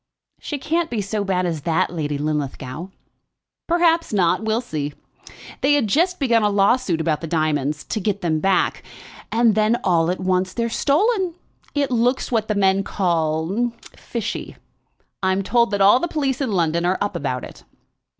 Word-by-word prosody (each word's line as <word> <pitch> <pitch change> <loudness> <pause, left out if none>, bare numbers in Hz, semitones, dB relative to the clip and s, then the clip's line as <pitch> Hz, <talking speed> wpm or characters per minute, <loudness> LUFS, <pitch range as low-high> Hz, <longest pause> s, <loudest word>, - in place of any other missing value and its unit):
"She 295 - -4
can't 325 +4 -1
be 235 - -2
so 205 +1 -2
bad 185 -2 0
as 165 -4 -2
that, 170 +4 0
Lady 150 -4 -2
Linlithgow." 145 +1 -3 0.8
"Perhaps 335 -1 +2
not. 190 -1 +2
We 220 - -1
shall 230 - +1
see. 150 - -4 0.7
They 275 +2 +4
had 290 -5 +3
just 345 - +1
begun 235 -5 +3
a 210 - +3
lawsuit 200 -2 +2
about 160 -2 0
the 165 - -4
diamonds, 155 -2 0
to 220 - -3
get 205 0 -1
them 160 -3 0
back. 195 +3 +1 0.5
And 230 -1 +4
then 215 +3 +2
all 170 -2 +2
at 180 - -1
once, 185 0 0
they're 235 -1 -1
stolen. 365 - +1 0.4
It 280 -2 0
looks 245 +2 +1
what 220 -3 +1
the 215 - 0
men 195 0 +3
call 175 +5 0 0.2
fishy. 230 -1 -5 0.7
I'm 190 0 +1
told 235 +4 +2
that 205 -2 -1
all 205 +5 +6
the 345 - -1
police 280 -5 -1
in 260 -5 -1
London 170 -3 +1
are 180 +2 +1
up 205 -2 -2
about 135 -6 -2
it." - - -11
200 Hz, 175 wpm, -21 LUFS, 170-240 Hz, 0.8 s, all